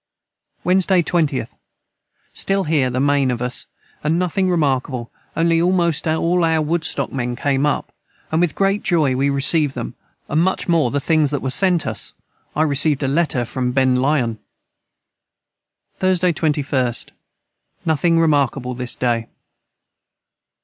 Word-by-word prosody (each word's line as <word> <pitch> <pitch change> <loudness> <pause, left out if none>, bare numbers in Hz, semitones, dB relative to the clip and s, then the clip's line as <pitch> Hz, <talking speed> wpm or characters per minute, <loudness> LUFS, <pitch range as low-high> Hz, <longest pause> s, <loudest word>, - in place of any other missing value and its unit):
Wednesday 185 0 +3
20th. 150 -8 -1 0.8
Stil 195 0 0
Here 150 -6 +1
the 125 +1 -2
main 140 -1 +2
of 120 -2 -1
us 125 0 -3 0.2
& - - -34
Nothing 180 +4 0
remarkable 135 -7 -1 0.3
only 165 0 +2
almost 170 -3 +1
all 170 +2 +1
our 160 -1 +2
woodstock 155 -3 -1
men 125 -2 -2
came 140 +2 0
up 145 - -2 0.2
& - - -35
with 160 0 +1
great 195 +1 +1
Joy 155 -7 +1
we 135 +2 +1
recived 140 +1 +2
them 120 -1 -5 0.3
& - - -44
much 170 +6 0
more 165 -7 +2
the 145 - -1
things 155 0 +2
that 145 -1 -3
were 130 - -1
sent 180 +1 +2
us, - - -3 0.4
I 155 - +2
receved 145 -1 +2
a - - +1
letter 140 -4 +1
from 125 +1 -2
Ben 130 -1 +3
Lyon. 125 -4 0 1.6
Thursday 185 -2 +2
21st. 145 -6 -1 0.8
Nothing 165 +1 +2
remarkable 140 -5 +1
this 125 0 -2
day. 120 -2 -1
150 Hz, 140 wpm, -20 LUFS, 130-170 Hz, 1.6 s, Wednesday